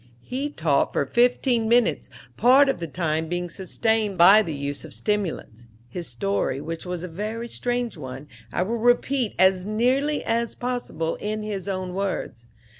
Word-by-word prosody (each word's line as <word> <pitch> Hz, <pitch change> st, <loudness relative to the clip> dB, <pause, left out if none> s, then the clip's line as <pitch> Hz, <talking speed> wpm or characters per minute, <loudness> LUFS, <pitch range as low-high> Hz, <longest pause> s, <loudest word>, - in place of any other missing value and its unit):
He 270 Hz, -, -3 dB
talked 155 Hz, -, +1 dB
for -, -, +1 dB
fifteen 240 Hz, -, +2 dB
minutes, 240 Hz, +1 st, +2 dB, 0.3 s
part 270 Hz, +3 st, +5 dB
of 270 Hz, -, -1 dB
the 170 Hz, -, -4 dB
time 160 Hz, 0 st, -1 dB
being 175 Hz, 0 st, -3 dB
sustained 210 Hz, +2 st, -1 dB
by 195 Hz, +5 st, +8 dB
the 160 Hz, -7 st, -4 dB
use 140 Hz, 0 st, -4 dB
of 155 Hz, -3 st, -7 dB
stimulants. 170 Hz, -, -2 dB, 0.2 s
His 175 Hz, +5 st, -5 dB
story, 195 Hz, -9 st, -1 dB
which 165 Hz, +4 st, -6 dB
was 180 Hz, -1 st, -4 dB
a -, -, -4 dB
very 215 Hz, +7 st, -4 dB
strange 245 Hz, -3 st, -2 dB
one, 135 Hz, 0 st, -8 dB, 0.2 s
I -, -, 0 dB
will 230 Hz, +5 st, -2 dB
repeat 245 Hz, +1 st, +2 dB
as 190 Hz, 0 st, +3 dB
nearly 260 Hz, +7 st, +1 dB
as 230 Hz, 0 st, -1 dB
possible 245 Hz, -10 st, -3 dB
in 215 Hz, +1 st, -3 dB
his 200 Hz, -3 st, -4 dB
own 185 Hz, -2 st, -3 dB
words. 185 Hz, -11 st, -3 dB
200 Hz, 165 wpm, -24 LUFS, 165-235 Hz, 0.3 s, by